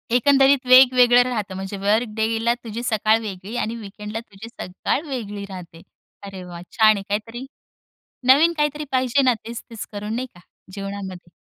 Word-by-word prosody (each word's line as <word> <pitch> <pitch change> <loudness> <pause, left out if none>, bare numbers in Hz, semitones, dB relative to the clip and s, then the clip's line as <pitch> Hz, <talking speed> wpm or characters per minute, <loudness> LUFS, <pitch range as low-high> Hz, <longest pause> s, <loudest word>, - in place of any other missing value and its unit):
एकंदरीत 270 +1 +4
वेगवेगळं 250 -1 +7
राहतं 215 -6 -4
म्हणजे 195 +1 -6
वर्क 210 +5 +1
डेला 225 +1 +1
तुझी 230 +1 -6
सकाळ 220 -1 +2
वेगळी 200 +1 -7
आणि 225 +2 -4
वीकेंडला 210 0 -7
तुझी 220 -1 -12
सकाळ 190 +5 -3
वेगळी 210 -7 -5
राहते. 175 -3 -10 0.4
अरे 195 -2 -8
वाह! 175 -1 -9
छान 215 -2 +5
आहे. 195 - -5
काहीतरी 225 +5 -4 0.9
नवीन 325 +5 +5
काहीतरी 295 0 -1
पाहिजे 260 +1 +2
ना, 255 -2 +4
तेच-तेच 230 -1 -8
करून 210 +1 -5
नाही 255 +1 -3
का, - - -15 0.3
जीवनामध्ये. 195 -3 -7
220 Hz, 150 wpm, -22 LUFS, 200-250 Hz, 0.9 s, वेगवेगळं